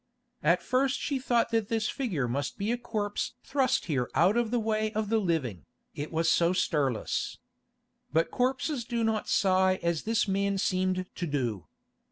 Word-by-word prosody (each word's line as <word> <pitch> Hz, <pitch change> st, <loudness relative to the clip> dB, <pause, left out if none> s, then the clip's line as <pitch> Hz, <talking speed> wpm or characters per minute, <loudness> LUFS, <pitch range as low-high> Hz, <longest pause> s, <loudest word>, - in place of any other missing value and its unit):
At -, -, +3 dB
first 265 Hz, +2 st, +1 dB
she 280 Hz, -2 st, -1 dB
thought 240 Hz, -3 st, +1 dB
that 225 Hz, -3 st, +1 dB
this 220 Hz, -1 st, 0 dB
figure 185 Hz, -, -1 dB
must 140 Hz, +4 st, -2 dB
be 205 Hz, +3 st, -1 dB
a 240 Hz, -, 0 dB
corpse 210 Hz, -2 st, -3 dB
thrust 265 Hz, -2 st, +1 dB
here 135 Hz, -7 st, -1 dB
out 175 Hz, +9 st, +4 dB
of 235 Hz, -2 st, +1 dB
the 245 Hz, -, +1 dB
way 215 Hz, -1 st, 0 dB
of 215 Hz, -1 st, -1 dB
the 225 Hz, 0 st, +3 dB
living, 145 Hz, -, -2 dB, 0.3 s
it 145 Hz, +1 st, -5 dB
was 165 Hz, 0 st, +1 dB
so 170 Hz, +2 st, +4 dB
stirless. 145 Hz, -9 st, 0 dB, 0.7 s
But 165 Hz, +2 st, +2 dB
corpses 255 Hz, +1 st, 0 dB
do 235 Hz, 0 st, -2 dB
not 220 Hz, -1 st, 0 dB
sigh 190 Hz, -1 st, +3 dB
as 170 Hz, -2 st, +1 dB
this 225 Hz, 0 st, +1 dB
man 200 Hz, 0 st, +1 dB
seemed 185 Hz, -1 st, 0 dB
to 175 Hz, -, -3 dB
do. 120 Hz, -, -2 dB
200 Hz, 175 wpm, -29 LUFS, 165-230 Hz, 0.7 s, out